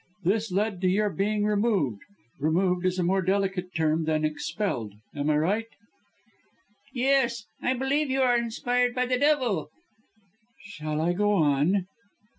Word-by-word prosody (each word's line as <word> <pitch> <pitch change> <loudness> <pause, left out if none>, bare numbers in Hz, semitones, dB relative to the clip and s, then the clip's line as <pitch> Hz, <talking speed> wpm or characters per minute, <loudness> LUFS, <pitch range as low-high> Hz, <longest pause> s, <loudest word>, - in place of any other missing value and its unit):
This 210 +4 0
led 200 0 -1
to 185 - +2
your 205 +2 +1
being 205 +2 0
removed. 205 - +1 0.4
Removed 180 +4 +1
is 185 0 -1
a 180 - +1
more 190 +2 +2
delicate 190 0 0
term 160 0 +1
than 155 -1 +1
'expelled.' 155 - -3 0.2
Am 145 +1 -1
I 150 - +3
right?" 205 +9 0 1.2
"Yes! 250 -3 +1 0.2
I 255 - +1
believe 275 +3 0
you 265 +1 +1
are 245 -1 +4
inspired 245 +1 0
by 250 0 +1
the 250 0 0
devil." 255 - +1 0.9
"Shall 155 -7 -5
I 170 +2 +1
go 205 +3 +1
on?" 160 +3 +2
195 Hz, 145 wpm, -26 LUFS, 160-235 Hz, 1.2 s, are